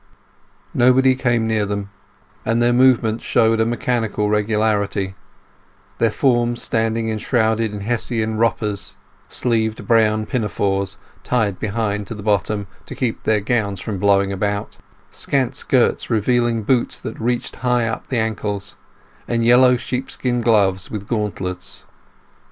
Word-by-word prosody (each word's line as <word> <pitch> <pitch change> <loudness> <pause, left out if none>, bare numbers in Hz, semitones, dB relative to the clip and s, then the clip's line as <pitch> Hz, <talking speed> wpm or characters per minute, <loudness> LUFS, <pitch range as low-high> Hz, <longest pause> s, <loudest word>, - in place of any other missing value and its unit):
Nobody 130 +2 +4
came 120 -3 +1
near 110 -1 +1
them, 100 0 -4 0.5
and 115 +1 +1
their 120 0 +3
movements 120 -3 +3
showed 115 -1 +2
a 110 - +2
mechanical 115 -3 -1
regularity; 105 -2 0 0.9
their 115 - +3
forms 120 0 +1
standing 115 0 0
enshrouded 110 0 0
in 105 -1 -6
Hessian 110 0 -1
"wroppers"—sleeved 110 +1 -2
brown 110 -1 +3
pinafores, 100 -4 -1 0.2
tied 110 -6 0
behind 105 -1 -2
to 115 - -5
the 105 - -8
bottom, 105 0 0 0.2
to - - -7
keep 120 -4 -2
their 110 -2 +2
gowns 100 -3 -1
from 100 0 -4
blowing 100 0 +3
about—scant 105 +6 -3
skirts 125 -3 +1
revealing 120 0 +1
boots 125 +2 0
that 110 - -7
reached 120 +1 -2
high 125 -2 +1
up 110 - -4
the 130 - -1
ankles, 105 -3 -3 0.5
and 115 -1 0
yellow 125 +1 +6
sheepskin 125 0 -2
gloves 100 -5 +2
with 105 -2 -6
gauntlets. 95 -5 -3
110 Hz, 125 wpm, -20 LUFS, 105-120 Hz, 0.9 s, yellow